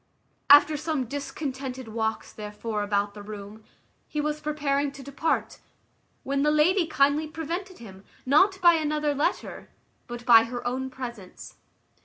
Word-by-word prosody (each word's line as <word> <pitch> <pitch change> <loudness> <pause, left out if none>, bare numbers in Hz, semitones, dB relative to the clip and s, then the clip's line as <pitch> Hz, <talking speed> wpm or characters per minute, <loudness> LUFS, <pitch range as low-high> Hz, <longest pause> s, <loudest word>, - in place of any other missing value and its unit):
After 290 +1 +7
some 305 -3 -2
discontented 265 -2 -5
walks 220 0 -3
therefore 210 +1 -5
about 205 0 0
the 205 - -10
room, 205 +1 -9 0.4
he 300 - -4
was 300 0 -2
preparing 290 -2 -1
to 275 -1 -10
depart, 280 +4 -2 0.6
when 275 +1 -1
the 300 - +3
lady 325 +4 +3
kindly 290 +1 +2
prevented 335 +5 -5
him, 195 -4 -12 0.2
not 375 +9 +4
by 345 -1 +7
another 300 -2 0
letter, 285 +1 -2 0.4
but 240 0 -8
by 230 -2 +7
her 240 +1 -6
own 260 +2 -2
presence. 240 -7 -9
275 Hz, 140 wpm, -26 LUFS, 230-300 Hz, 0.6 s, After